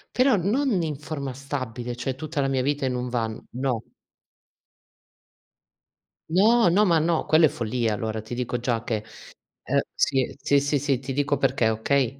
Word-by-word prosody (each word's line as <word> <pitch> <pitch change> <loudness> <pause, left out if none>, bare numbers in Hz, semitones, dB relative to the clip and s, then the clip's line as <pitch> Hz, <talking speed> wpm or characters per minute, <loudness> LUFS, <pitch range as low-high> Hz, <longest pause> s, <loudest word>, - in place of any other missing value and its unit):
Però 255 0 +4
non 210 +4 +1
in 155 -2 -2
forma 140 -2 -5
stabile, 125 -3 -5
cioè 130 +2 -3
tutta 155 +3 -5
la 135 - +2
mia 135 -1 +1
vita 140 +1 0
in 130 - 0
un 125 0 -3
van, 115 -3 -3
no. 125 -2 -1 2.5
No, 210 +5 +5
no, 200 +5 +4
ma 170 -4 +4
no, 165 +1 +1
quello 160 +1 +5
è - - +6
follia. 115 -1 -1
Allora, 110 +1 -3
ti 110 +3 -8
dico 125 0 -2
già 120 -1 -1
che 110 -2 -2 0.6
è - - -1 0.2
sì, 130 -2 +1
sì, 140 0 +2
sì, 145 +1 0
sì, 140 -2 0
ti 135 +1 -5
dico 145 +1 +1
perché, 130 -4 +2
okay, 130 +4 0
135 Hz, 170 wpm, -25 LUFS, 120-155 Hz, 2.5 s, è